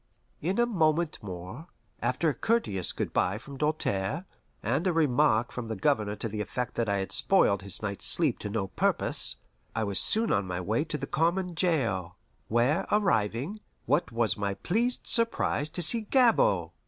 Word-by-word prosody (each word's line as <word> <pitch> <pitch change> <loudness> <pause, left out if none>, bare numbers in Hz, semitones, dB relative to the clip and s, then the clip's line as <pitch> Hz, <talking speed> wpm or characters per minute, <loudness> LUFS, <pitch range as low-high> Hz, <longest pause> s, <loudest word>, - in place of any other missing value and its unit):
In 180 +6 -1
a 240 - +5
moment 165 -7 +1
more, 95 - -8 0.3
after 125 +7 0
a - - 0
courteous 135 - 0
good - - -4
by 95 +3 +1
from 140 +5 -10
Doltaire, 150 - -1 0.4
and 135 - 0
a 180 - +2
remark 145 -6 +2
from 125 -2 -6
the 110 - -3
Governor 105 -2 0
to 115 - -4
the 105 -1 -4
effect 125 +3 -4
that 115 -3 -1
I 100 - +1
had 95 0 -3
spoiled 100 -1 +3
his 100 +1 -5
night's 100 -2 -1
sleep - - +4
to 105 - -5
no 100 -2 -2
purpose, - - 0 0.4
I 110 - 0
was 100 -3 0
soon 225 +1 +3
on 100 -1 +1
my 90 -1 -3
way 110 - -1
to 155 - -3
the 140 - -4
common 175 +5 0
jail, 115 - 0 0.3
where 130 - +1
arriving, 155 - 0 0.3
what 145 -2 +1
was 115 -3 +1
my 100 -1 -2
pleased 235 - -1
surprise 230 -10 +1
to 175 +3 -1
see 225 +8 +4
Gabord! 265 - +3
125 Hz, 180 wpm, -28 LUFS, 105-170 Hz, 0.4 s, a